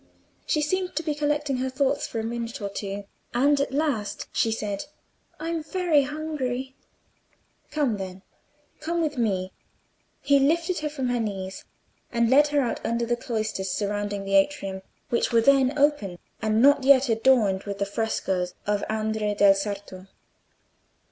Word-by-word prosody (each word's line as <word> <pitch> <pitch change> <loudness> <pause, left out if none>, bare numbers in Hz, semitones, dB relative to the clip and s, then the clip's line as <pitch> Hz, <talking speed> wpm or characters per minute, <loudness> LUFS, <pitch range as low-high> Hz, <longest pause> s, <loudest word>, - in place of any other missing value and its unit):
She 305 - +1
seemed 365 +4 -1
to 325 - -1
be 305 - -1
collecting 295 -2 0
her 260 +1 -1
thoughts 265 +1 0
for 225 - -4
a - - -2
minute 235 +2 -4
or 200 -2 -3
two, 200 0 -5 0.3
and 280 +3 +4
at 280 - -1
last 275 -8 -1
she 225 - +1
said— 210 0 -3 0.5
"I'm 330 +1 -2
very 335 -2 +2
hungry." 270 -3 -3 0.9
"Come, 275 -8 0
then; 190 0 -7 0.6
come 335 +2 -2
with 300 -5 -1
me." 190 -5 0 0.7
He 280 0 +3
lifted 335 +5 +1
her 300 0 -2
from 270 -4 -3
her 245 -1 0
knees, 190 -4 -4 0.5
and 235 0 +2
led 290 +3 +6
her 290 -1 +2
out 245 - -2
under 235 0 0
the 240 +1 +1
cloisters 215 -5 -3
surrounding 205 0 -2
the 195 - -3
atrium, 195 -2 +1 0.3
which 235 - +1
were 230 - +5
then 270 +3 +4
open, 280 -11 +1 0.2
and 220 +1 +2
not 285 -1 +6
yet 270 0 +6
adorned 225 -4 +3
with 200 -1 -4
the 200 - 0
frescoes 190 -4 -2
of 205 0 0
Andrea 215 -1 -1
del 200 -1 +6
Sarto. 195 -1 -5
235 Hz, 160 wpm, -25 LUFS, 205-290 Hz, 0.9 s, led